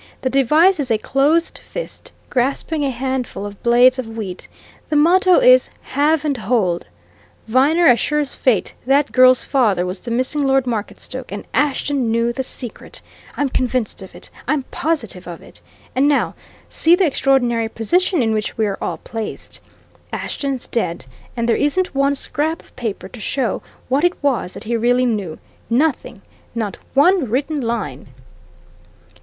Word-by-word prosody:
The 260 - -1
device 305 +7 +4
is 275 -3 -2
a 225 - +3
closed 290 +9 +1
fist, - - -8 0.2
grasping 280 +4 0
a 280 - +1
handful 255 -4 -3
of 205 -1 -9
blades 245 +2 +5
of 250 - -4
wheat; 215 -5 -7 0.4
the 305 - 0
motto 360 +4 +5
is - - +6 0.2
Have 305 +1 +2
and 290 -2 +1
Hold. 210 -6 0 0.6
Viner, 285 +9 +3
as 245 -5 +6
sure 300 - 0
as 290 -2 -1
fate, 245 -6 +1
that 280 +2 +3
girl's 255 0 +6
father 215 -10 +1
was 180 +1 -4
the 240 - -8
missing 255 +5 -1
Lord 270 -2 +2
Marketstoke, 245 +2 -5
and 205 - -6
Ashton 280 -3 0
knew 230 +1 +1
the 265 - -2
secret! 255 -2 -8 0.4
I'm 285 - +1
convinced 250 -5 -1
of 190 - -11
it - - -14 0.2
I'm 280 0 +1
positive 255 - -2
of 170 -2 -8
it. - - -17 0.3
And 270 +3 +3
now 290 -1 +1 0.3
see 330 +2 +4
the 375 +1 +2
extraordinary 245 -6 +1
position 345 - +1
in 220 -1 +1
which 215 -1 -3
we're 210 -3 -1
all - - -2
placed. 225 -2 -7 0.5
Ashton's 275 -3 -3
dead, 170 - -2 0.3
and 235 0 0
there 230 - +3
isn't 325 +6 0
one 275 +1 +2
scrap 310 +4 -2
of - - -25
paper 225 -5 -4
to 245 - -12
show 240 +1 -1 0.3
what 270 +4 +1
it 355 0 +4
was 260 -10 0
that - - -9
he 235 +1 -2
really 245 +2 +2
knew. 205 -9 -2 0.3
Nothing 275 +5 0 0.3
not 220 -4 -3 0.2
one 310 - +4
written 285 +5 -1
line!" 225 - -3
255 Hz, 160 wpm, -19 LUFS, 230-290 Hz, 0.6 s, is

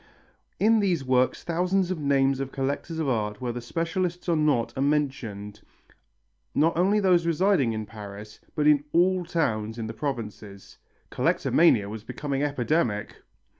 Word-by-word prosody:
In 225 +1 +4
these 180 -8 +1
works 130 0 +1
thousands 180 +2 0
of 180 - -3
names 135 -2 +2
of 135 -1 -4
collectors 140 +4 -3
of 160 -3 -1
art, 105 -4 -1
whether 120 -1 -4
specialists 170 +7 -3
or 170 - +2
not, 135 -7 +1
are 130 - -2
mentioned, 130 -8 -2 0.9
not 160 +3 +3
only 195 +5 +3
those 180 -4 +3
residing 170 - +2
in 110 -1 -4
Paris 105 -1 -10 0.2
but 150 - 0
in 150 -1 +5
all 180 +2 +3
towns 110 -10 -1
of 115 - -4
the 110 - -5
provinces. 110 -6 -6 0.3
Collectomania 120 -12 +3
was 105 +1 -7
becoming 135 +3 -3
epidemic! 140 -5 -1
140 Hz, 145 wpm, -26 LUFS, 115-170 Hz, 0.9 s, in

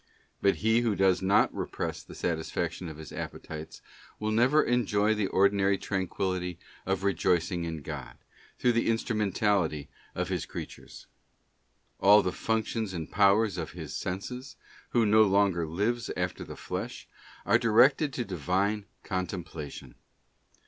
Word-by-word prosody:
But 100 - +4
he 110 +1 +5
who 115 -4 +1
does 95 -2 +3
not 95 +2 +3
repress - - -3
the - - -13
satisfaction 85 +1 -2
of 80 - -9
his 80 -1 -10
appetites 80 0 -7 0.4
will 110 0 -1
never 125 +7 +4
enjoy 110 -3 +2
the 105 -2 0
ordinary 100 0 +3
tranquillity 95 -2 -2 0.3
of 95 -1 0
rejoicing 90 -2 +1
in 80 -3 -5
God, 70 -5 -7 0.4
through 125 - +3
the 115 0 +1
instrumentality 100 - 0 0.3
of - - -2
His - - -2
creatures. - - -9 0.9
All 105 +2 +7
the 90 - 0
functions 110 -1 -2
and 80 -2 -5
powers 100 0 +3
of 80 -2 -5
his 80 -5 -7
senses, 125 +9 -5 0.3
who 120 -2 +3
no 110 +1 +5
longer 100 -5 +3
lives 105 +8 -1
after - - -2
the - - -9
flesh, - - -5 0.4
are - - +4
directed 125 +6 +4
to 120 -1 -2
Divine 100 +4 -1 0.2
Contemplation. 90 -5 -5
100 Hz, 135 wpm, -29 LUFS, 90-110 Hz, 0.9 s, All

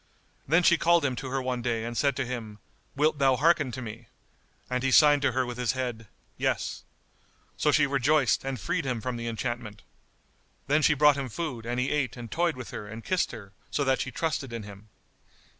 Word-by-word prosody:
Then 165 +6 +4
she 170 -1 +5
called 170 -2 +4
him 130 -2 0
to 130 - -5
her 135 0 -2
one 125 -1 -2
day 115 -2 -1
and 120 0 -5
said 140 +1 +2
to 135 - -1
him, 115 -4 -6 0.4
"Wilt 150 +1 +2
thou 135 -2 +4
hearken 150 -2 +3
to 130 +1 -5
me?" 110 0 -9 0.6
And 125 0 -1
he 135 - +1
signed 145 +1 +6
to 140 -3 +1
her 130 +1 +1
with 125 0 -6
his 125 -1 +1
head, 120 -4 -4 0.3
"Yes." - - -1 0.7
So 150 - +2
she 155 0 +4
rejoiced 140 0 +2
and 135 -2 -3
freed - - -1
him 130 -4 -2
from 125 +2 -3
the 115 0 -5
enchantment. 115 -2 -4 0.8
Then 150 +2 +2
she 150 - +4
brought 150 0 +5
him 135 -2 -3
food 120 -4 -5
and 120 +1 -1
he 125 - 0
ate 135 -4 -1
and 120 -2 -8
toyed 170 -1 +1
with 125 -2 -8
her 105 - -6
and 110 +2 -8
kissed 185 -1 0
her, 100 -4 -10 0.2
so 145 - 0
that 135 -1 +1
she - - -3
trusted 135 -1 -2
in 115 -2 -5
him. 100 +1 -12
130 Hz, 215 wpm, -27 LUFS, 120-145 Hz, 0.8 s, signed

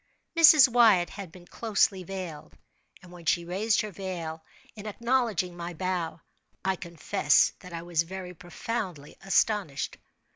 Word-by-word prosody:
Mrs. 310 -4 +8
Wyatt 225 -8 +4
had 195 -5 -8
been 175 0 -14
closely 200 -2 0
veiled; 180 -4 -7 0.5
and 180 - -14
when 175 -2 -12
she 170 - +2
raised 200 +5 +1
her 215 - -5
veil, 170 -4 -6 0.3
in 215 0 -8
acknowledging 225 -6 0
my 175 0 -6
bow, 175 -1 -3 0.4
I 190 0 +2
confess 170 -4 +2
that 180 - -12
I 165 0 -6
was 170 -2 +1
very 180 +1 -7
profoundly 180 -3 -5
astonished. 195 -5 0
180 Hz, 140 wpm, -28 LUFS, 170-210 Hz, 0.5 s, Mrs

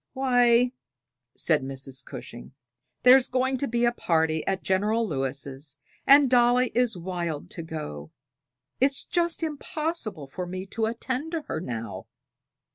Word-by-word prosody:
"Why," 245 -2 +4 0.7
said 155 -3 +2
Mrs. 135 -1 -5
Cushing, 120 +2 -9 0.5
"there's 255 +1 +7
going 260 +1 0
to 280 - -2
be 235 +1 +1
a 240 - +3
party 160 -7 0
at 195 -1 -1
General 210 +4 +1
Lewis', 140 -1 -3 0.3
and 280 0 +8
Dolly 245 0 +4
is 240 -4 +1
wild 170 -4 -4
to 170 - -5
go. 80 - -7 0.7
It's 275 +1 +2
just 340 -1 0
impossible 305 - -2
for 180 +7 -6
me 185 +1 -5
to 220 +3 -2
attend 260 +7 -3
to 325 -2 -2
her 155 - -4
now." 115 - -6
215 Hz, 135 wpm, -26 LUFS, 155-255 Hz, 0.7 s, and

